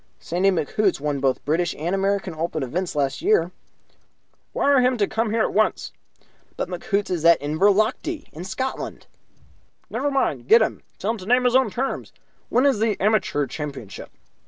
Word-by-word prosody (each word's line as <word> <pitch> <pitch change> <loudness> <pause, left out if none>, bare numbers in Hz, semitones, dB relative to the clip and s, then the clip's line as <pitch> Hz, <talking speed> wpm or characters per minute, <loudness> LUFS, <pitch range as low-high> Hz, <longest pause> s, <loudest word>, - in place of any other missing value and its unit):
"Sandy 180 +3 +1
McHoots 185 +2 0
won 145 -1 -2
both 135 -1 0
British 165 +3 0
and 170 +5 -2
American 195 -1 0
Open 160 -2 -3
events 170 +8 -3
last 140 - -1
year." 425 +5 +2 1.0
"Wire 280 -2 +3
him 250 0 +2
to 205 - +2
come 225 +2 -1
here 220 +1 +1
at - - -1
once." 215 +1 +1 0.7
"But - - -3
McHoots 195 +3 -2
is 170 -3 -1
in 170 -1 +7
Inverlochty, 205 - +1
in 160 - -7
Scotland." 260 +8 -4 0.9
"Never 290 - -1
mind. 145 - -1
Get 225 +6 +7
him; - - -3 0.2
tell 205 - -1
him 230 - -4
to 185 - -10
name 250 +2 +4
his 250 0 +2
own 260 -3 +4
terms. 260 +6 -4 0.4
When 250 +4 +3
is 275 -7 +3
the 215 -2 0
Amateur 190 -8 +1
Championship?" 140 -6 -7
195 Hz, 170 wpm, -23 LUFS, 160-230 Hz, 1.0 s, in